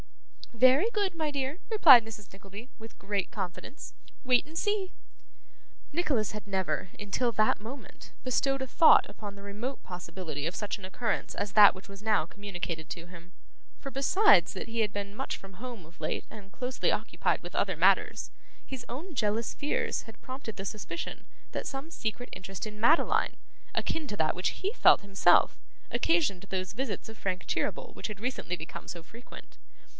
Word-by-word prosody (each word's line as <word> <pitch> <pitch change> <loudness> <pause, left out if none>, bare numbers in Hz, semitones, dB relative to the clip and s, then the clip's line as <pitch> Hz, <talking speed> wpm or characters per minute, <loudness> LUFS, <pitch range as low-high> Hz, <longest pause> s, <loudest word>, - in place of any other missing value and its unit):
'Very 255 - +5
good, 400 -4 0
my 315 -2 0
dear,' 280 +3 -2
replied 295 - +9
Mrs. 215 -2 -10
Nickleby, 200 +5 -11
with 225 0 -12
great 200 -1 -2
confidence. 195 - -6 0.3
'Wait 250 -1 +4
and 315 +2 -9
see.' 410 -1 0 1.0
Nicholas 285 - +1
had 210 0 -7
never, 185 -4 -1
until 210 +4 0
that 215 0 +2
moment, 255 +6 -10
bestowed 270 +1 +1
a 265 - -2
thought 320 +5 +6
upon 205 -2 -8
the 200 - -12
remote 215 +7 -5
possibility 170 -4 -5
of 170 - -2
such 210 -1 -2
an 195 - -9
occurrence 220 +3 -2
as 200 0 -3
that 210 -1 +9
which 185 - -12
was 195 +1 -11
now 215 -7 +3
communicated 175 -4 -5
to 170 -1 -6
him; 175 0 -13 0.5
for, 275 - -6
besides 375 +11 +5
that - - -5
he 230 0 -1
had 210 -2 +1
been 200 0 -5
much 270 - -3
from 195 0 -13
home 235 -3 -8
of 165 +1 -19
late 155 - -2
and 200 -2 -12
closely 255 +3 -1
occupied - - 0
with - - -9
other - - +1
matters, - - +3 0.4
his 260 -3 -7
own 315 +9 -6
jealous 220 0 0
fears 290 0 -1
had 225 -2 -13
prompted 255 -4 -7
the 195 - -5
suspicion 215 - -5 0.3
that - - -3
some 270 +4 -5
secret 235 -2 -3
interest 190 +2 -6
in 210 0 -9
Madeline, 305 +9 +3 0.4
akin 320 -2 -1
to 210 - -4
that 155 -3 +2
which 180 - +1
he 400 +3 -3
felt - - +6
himself, 200 0 +4 0.3
occasioned 295 - +2
those 185 +1 -2
visits 230 -4 -3
of 220 0 -10
Frank 185 -1 -2
Cheeryble - - -2
which - - -5
had 210 -3 -7
recently 240 -6 -2
become 160 - -8
so 170 - -6
frequent. 230 +8 -13
215 Hz, 175 wpm, -30 LUFS, 195-265 Hz, 1.0 s, replied